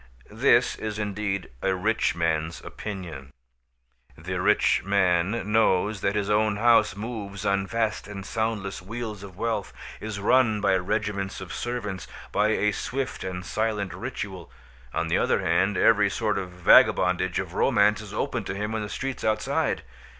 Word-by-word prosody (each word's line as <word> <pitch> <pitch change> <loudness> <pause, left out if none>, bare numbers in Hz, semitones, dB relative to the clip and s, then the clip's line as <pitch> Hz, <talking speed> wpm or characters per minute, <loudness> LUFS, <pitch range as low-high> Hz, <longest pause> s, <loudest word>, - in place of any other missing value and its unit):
This - - +3
is 110 -1 -4
indeed 105 -2 -3
a 95 -1 +1
rich 105 -2 +1
man's 80 -1 -1
opinion. 85 -10 -7 0.9
The - - -4
rich - - +3
man 100 +2 +1
knows 105 -2 +2
that 100 - 0
his 100 -1 0
own 105 0 +2
house 115 0 +4
moves 105 -2 -6
on 100 -1 +1
vast 110 0 -1
and 100 -2 -7
soundless 110 -4 -2
wheels 110 +1 -6
of 95 -3 -11
wealth, 115 -3 -2 0.3
is 105 -2 -5
run 110 +1 +3
by 100 -2 +3
regiments 100 +1 -2
of 95 -2 -7
servants, 105 -7 -4 0.2
by 105 +1 +2
a 105 -1 +2
swift 130 +5 -3
and 90 -1 -5
silent 110 -2 -1
ritual. - - -6 0.4
On - - -1
the - - +2
other - - +2
hand, 100 +1 +2
every 105 -2 +4
sort 105 -1 -1
of 95 -2 -5
vagabondage 90 0 +4
of 95 -2 -3
romance 105 -2 +3
is 105 -2 -10
open 125 -2 -2
to 95 - -4
him 105 +2 -3
in 110 - -1
the 105 - -5
streets 130 +5 -4
outside. 110 0 0
105 Hz, 155 wpm, -26 LUFS, 95-110 Hz, 0.9 s, house